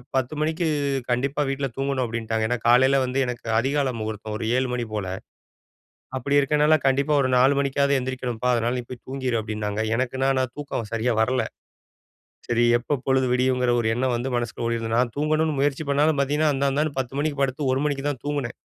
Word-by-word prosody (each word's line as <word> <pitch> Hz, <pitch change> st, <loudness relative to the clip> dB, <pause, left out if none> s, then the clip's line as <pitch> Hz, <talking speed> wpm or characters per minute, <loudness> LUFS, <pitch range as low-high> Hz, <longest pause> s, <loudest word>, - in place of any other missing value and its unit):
10:00 130 Hz, +1 st, 0 dB
மணிக்கு 160 Hz, +3 st, 0 dB, 0.4 s
கண்டிப்பா 135 Hz, +4 st, 0 dB
வீட்ல 135 Hz, 0 st, -1 dB
தூங்கணும் 135 Hz, -1 st, 0 dB
அப்பிடின்ட்டாங்க. 115 Hz, -1 st, -2 dB
ஏன்னா, 125 Hz, +2 st, 0 dB
காலையில 130 Hz, +3 st, +5 dB
வந்து 130 Hz, +2 st, -1 dB
எனக்கு 125 Hz, -1 st, -5 dB
அதிகால 135 Hz, +2 st, 0 dB
முகூர்த்தம் 110 Hz, 0 st, -5 dB
ஒரு 110 Hz, -, -4 dB
7:00 130 Hz, 0 st, +1 dB
மணி 120 Hz, -1 st, -2 dB
போல. 105 Hz, -3 st, -2 dB, 1.1 s
அப்பிடி 140 Hz, +3 st, +2 dB
இருக்கனால, 150 Hz, +2 st, +3 dB
கண்டிப்பாக 140 Hz, +2 st, +2 dB
ஒரு 130 Hz, -, +1 dB
4:00 130 Hz, +3 st, +5 dB
மணிக்காவது 140 Hz, 0 st, +2 dB
எந்திரிக்கணும்பா. 125 Hz, -2 st, -3 dB
அதனால, 120 Hz, +1 st, 0 dB
"நீ -, -, -5 dB
போய் 125 Hz, -2 st, -9 dB
தூங்கிறு." 130 Hz, -3 st, -1 dB
அப்பிடின்னாங்க. 105 Hz, 0 st, -3 dB
எனக்குனா 130 Hz, +2 st, 0 dB
நான் 130 Hz, -1 st, -2 dB
தூக்கம் 140 Hz, -6 st, -4 dB
சரியா 115 Hz, +2 st, +1 dB
வரல. 125 Hz, +3 st, +1 dB, 1.1 s
சரி 120 Hz, 0 st, +2 dB
எப்ப 135 Hz, +4 st, -2 dB
பொழுது 130 Hz, -1 st, +2 dB
விடியுங்கிற 125 Hz, 0 st, +2 dB
ஒரு 115 Hz, -, -1 dB
எண்ணம் 130 Hz, 0 st, 0 dB
வந்து 125 Hz, +3 st, -3 dB
மனசுக்குள்ள 120 Hz, 0 st, -3 dB
ஓடியிருந்த 115 Hz, -1 st, -2 dB
நான் 120 Hz, -2 st, +1 dB
தூங்கணுனு 155 Hz, 0 st, +1 dB
முயற்சி 145 Hz, +1 st, +1 dB
பண்ணாலும் 145 Hz, +1 st, +2 dB
பார்த்தீங்கன்னா 150 Hz, +2 st, +2 dB
அந்தா, 140 Hz, +1 st, +1 dB
அந்தான்னு 150 Hz, +1 st, -1 dB
10:00 130 Hz, 0 st, -5 dB
மணிக்கு 145 Hz, -2 st, -2 dB
படுத்து 135 Hz, +1 st, 0 dB
1:00 130 Hz, -, +1 dB
மணிக்கு 140 Hz, -2 st, -2 dB
தான் 135 Hz, -5 st, -4 dB
தூங்குனேன். 145 Hz, -4 st, -2 dB
130 Hz, 180 wpm, -24 LUFS, 120-140 Hz, 1.1 s, காலையில